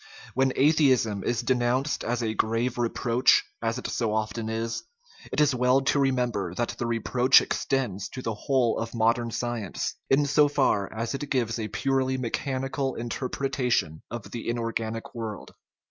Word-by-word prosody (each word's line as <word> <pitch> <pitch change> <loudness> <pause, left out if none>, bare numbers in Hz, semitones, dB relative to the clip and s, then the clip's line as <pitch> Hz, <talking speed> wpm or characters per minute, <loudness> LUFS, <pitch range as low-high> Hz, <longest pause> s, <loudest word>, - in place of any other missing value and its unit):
When 130 +1 +2
atheism 130 -8 +3
is 120 0 -1
denounced 125 +3 +1
as 120 +1 -1
a 110 -1 -1
grave 115 +3 0
reproach, 120 +1 +3 0.2
as 115 0 -1
it - - -7
so 110 -2 -1
often 110 +1 -2
is, 115 +1 -2 0.5
it - - -1
is 150 -2 +4
well 125 +2 +3
to 140 +1 +1
remem 130 -3 +2
ber 95 -5 -3
that 120 +2 -1
the 120 - -1
reproach 120 +2 +4
extends 120 -9 -2
to 130 - -7
the 115 - -1
whole 120 +2 +1
of 115 +1 -4
modern 115 +1 +2
science, 115 -4 -3 0.2
in 140 +2 +4
so 145 +1 +4
far 135 -9 +1
as 115 +1 -3
it 140 +1 -4
gives 120 -3 0
a 110 - -2
purely 130 +3 0
mechanical 135 +2 -2
inter 120 +2 -4
pretation 125 - -1
of 115 -3 -7
the 115 -1 -4
inorganic 115 -1 -3
world. 110 -4 -6
120 Hz, 165 wpm, -27 LUFS, 115-130 Hz, 0.5 s, is